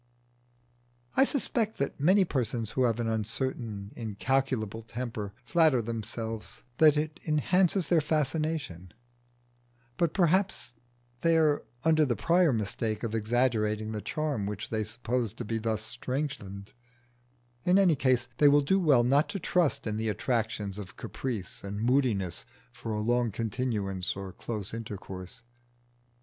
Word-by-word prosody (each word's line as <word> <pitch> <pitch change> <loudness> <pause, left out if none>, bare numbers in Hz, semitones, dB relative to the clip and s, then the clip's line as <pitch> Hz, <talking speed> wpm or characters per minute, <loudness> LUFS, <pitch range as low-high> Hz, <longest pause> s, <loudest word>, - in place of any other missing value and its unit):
I 265 - +6
suspect 235 -6 0
that 140 - -2
many 185 +7 +5
persons 120 - -2
who 130 - +2
have 115 -1 +1
an 115 - -1
uncertain, 110 -2 -2
incalculable 115 0 -1
temper 115 -2 -5
flatter 160 -3 +4
themselves 115 -1 -5 0.2
that 155 -2 +7
it 155 +1 -2
enhances 180 +4 +2
their 170 -3 +3
fascination; 150 - -2 1.0
but 170 -3 +1
perhaps 185 -4 +1 0.5
they 165 -1 +4
are 155 -2 +3 0.2
under 160 -1 +4
the 125 -5 +1
prior 170 +2 +3
mistake 110 -1 -2
of 115 -2 -2
exaggerating 110 -1 +1
the 105 -1 -4
charm 140 - -2
which 105 +1 -5
they 110 -1 0
suppose 120 0 -2
to 120 - -6
be 115 +1 -2
thus 110 -1 -1
strengthened; 125 -6 -4 0.9
in 180 +2 +4
any 185 -5 +5
case 130 -2 +2
they 145 - +7
will 145 +1 +6
do 190 +7 +3
well 145 -9 +5
not 140 +7 +3
to 200 -1 -3
trust 170 -2 +1
in 105 -1 -2
the 110 0 -1
attractions 105 -2 -1
of 95 -3 -9
caprice 115 -8 -5
and 100 +1 -5
moodiness 115 - +1 0.3
for 115 - -6
a 105 - -1
long 120 +2 +2
continuance 105 -4 -2
or 95 -1 -6
for - - -24
close 105 -4 -4
intercourse. 100 -2 -7
120 Hz, 140 wpm, -29 LUFS, 110-150 Hz, 1.0 s, that